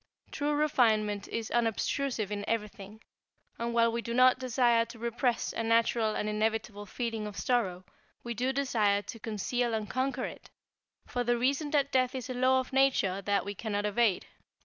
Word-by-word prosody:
True 295 0 -1
refinement 220 -9 +2
is 230 -1 -4
unobtrusive 235 -1 0
in 205 -1 -3
everything, 210 -1 -4 0.6
and 235 0 -2
while 230 0 +3
we 235 +1 -2
do 235 0 -4
not 255 0 +5
desire 240 -2 +3
to 230 - -12
repress 235 +1 -1
a - - -2
natural 230 -1 +2
and 210 - -2
inevitable 215 -1 -2
feeling 225 -1 -3
of 205 - -8
sorrow, 195 -8 0 0.4
we 240 - -4
do 250 +3 0
desire 220 -7 +1
to 230 - -8
conceal 230 +2 -1
and 215 -1 -3
conquer 260 +1 -1
it, - - -9 0.6
for 245 - -2
the 240 0 +1
reason 275 +5 0
that 285 -2 +1
death 255 0 +2
is 255 -1 -5
a - - -2
law 255 +1 +3
of 260 0 -5
nature 255 -8 +2
that 200 0 0
we 200 - -4
cannot 205 0 -3
evade. 210 -2 +1
230 Hz, 175 wpm, -30 LUFS, 210-255 Hz, 0.6 s, not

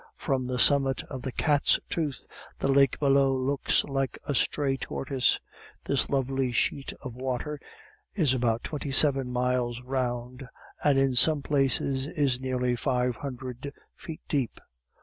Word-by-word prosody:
From 130 -2 -1
the 125 0 -2
summit 135 0 +3
of 130 -2 -5
the 130 - -4
Cat's 145 +2 +2
Tooth 150 -5 -3 0.3
the - - -1
lake 135 -1 +4
below 135 -1 +3
looks 135 +2 +1
like 135 -2 -2
a 145 - 0
stray 135 +1 +1
turquoise. 135 -1 0 0.5
This - - +1
lovely 135 -1 0
sheet 135 +3 0
of 130 -3 -6
water 130 +4 -3 0.6
is 155 -10 +3
about 120 -2 0
twenty 145 -2 -4
seven 135 -2 +3
miles 125 -1 0
round, 125 0 -3 0.4
and 145 -2 +4
in 135 -1 +3
some 145 +3 +3
places 135 -1 +1
is 140 -5 0
nearly 125 -1 0
five 125 -1 0
hundred 130 0 -6 0.2
feet 160 -4 -9
deep. 135 -7 -1
135 Hz, 145 wpm, -27 LUFS, 125-140 Hz, 0.6 s, lake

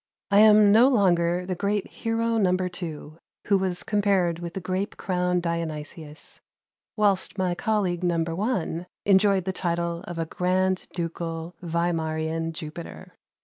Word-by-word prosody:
I 200 - +6
am 210 -1 +7
no 230 +5 +7
longer 180 -7 +2
the 185 - -2
great 200 +2 -1
hero 230 0 -1
No. 185 -3 +3
2, 170 -4 -6 0.3
who 200 - +3
was 185 -2 -1
compared 195 -5 +1
with 170 -1 -7
the - - -2
grape 185 +2 -3
crowned 180 -1 0
Dionysius, 160 -2 -5 0.6
whilst 205 -2 +1
my 185 -2 0
colleague 185 -1 -1
No. 170 -2 +1
1 175 -1 -2 0.2
enjoyed 195 -1 +4
the 190 - -2
title 170 -2 -2
of 175 - -6
a 165 - -1
Grand 185 +2 0
Ducal 165 0 -4
Wlimarian 165 -1 -1
Jupiter. 155 - -9
180 Hz, 140 wpm, -25 LUFS, 170-195 Hz, 0.6 s, am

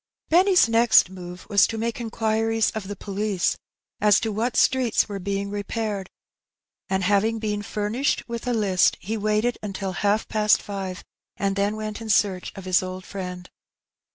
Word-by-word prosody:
282 - - +4
Her - - +9 0.2
Bennt. - - +7
Benny^s - - -6
next 230 -4 +5
move 180 -1 -9
was 200 -2 +4
to 225 - -5
make 230 +1 -2
inquiries 225 0 0
of 215 -4 -6
the 205 - -5
police 200 -1 -1 0.4
as 210 -1 +5
to 220 - -2
what 225 +3 -1
streets 255 -4 +3
were 200 -2 -5
being 200 +1 -3
repaired; 205 -1 -3 0.8
and^ 190 0 0
having 205 +4 +2
been 210 -2 -2
famished 210 +6 -1
with 235 0 -5
a 245 - +1
list, 195 -5 +2
he 215 +4 -4
waited 215 +3 0
until 195 -2 -4
half 205 +3 0
past 215 -1 +3
five^ 195 -3 -5 0.3
and 195 -1 0
then 200 +1 0
went 215 0 -5
in 225 - -7
search 195 -3 +1
of 195 - -9
his 185 -1 +3
old 185 0 -6
friend. 180 -2 -6
205 Hz, 180 wpm, -24 LUFS, 195-225 Hz, 0.8 s, Her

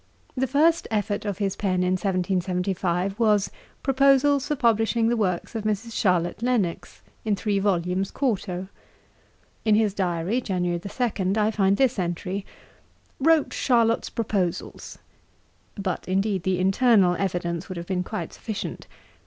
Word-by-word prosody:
The 265 0 0
first 320 +6 +3
effort 210 -1 -1
of 200 -3 -2
his 195 -2 -1
pen 185 -3 0
in 180 - +1
1775 185 0 -1
was, 210 -3 +3 0.3
'Proposals 275 +1 +3
for 300 - 0
publishing 230 -2 +2
the 240 - +2
Works 185 -6 -1
of 225 -2 -3
Mrs. 215 +2 -2
Charlotte 180 -1 +1
Lennox,'[Dagger] 235 -8 -2
in 215 -2 +1
three 200 0 0
volumes 190 -1 0
quarto. 195 -8 -2 1.0
In 215 -2 +4
his 215 -2 +2
diary, 185 +4 -1
January 180 -5 -1
2, 200 -1 -1
I 215 0 +2
find 195 -2 +2
this 260 -5 +2
entry: 185 +3 -3 0.7
'Wrote 320 +1 +3
Charlotte's 230 -3 +2
Proposals.' 200 -7 -3 0.8
But, 195 -3 -3
indeed, 195 +1 0
the 185 +1 0
internal 190 0 +4
evidence 175 -2 -2
would 185 - -5
have 170 - -5
been 185 0 -1
quite 215 +3 -5
sufficient. 220 -2 -6
200 Hz, 135 wpm, -25 LUFS, 185-230 Hz, 1.0 s, In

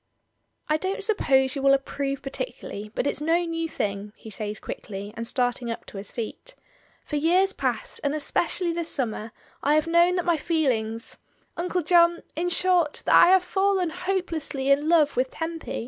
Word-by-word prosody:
"I 305 - +2
don't 380 +4 -3
suppose 265 - +2
you 275 - -3
will 275 0 +5
approve 275 0 -3
particularly, 270 - -6
but - - -1
it's 285 - -1
no 335 +3 +2
new 330 -1 -3
thing," 205 -5 -3
he 220 - -12
says, 210 +1 -5
quickly, 200 0 -7
and 230 +1 -3
start 245 0 0
ing 240 - -5
up 230 - -5
to - - -10
his 195 +1 -6
feet 245 - -6 0.5
"For 300 - -2
years 365 +6 +3
past, - - -3
and 285 +1 0
especially 340 +3 0
this 335 -1 -3
summer, 225 -4 -2 0.3
I 290 +2 +3
have 310 - +3
known 340 +2 +4
that 360 - -1
my 345 -2 +2
feelings, 240 -9 -1 0.4
Uncle 360 0 -1
John 340 +1 +4
— - - -36
in 345 +3 -1
short, 355 -3 +2
that - - +3
I - - +8
have 375 0 +5
fallen 385 -2 +1
hopelessly 340 -6 -2
in 290 +3 +3
love 315 -4 +4
with 255 +1 +1
Tempy. 325 +2 -5
310 Hz, 185 wpm, -25 LUFS, 260-350 Hz, 0.5 s, I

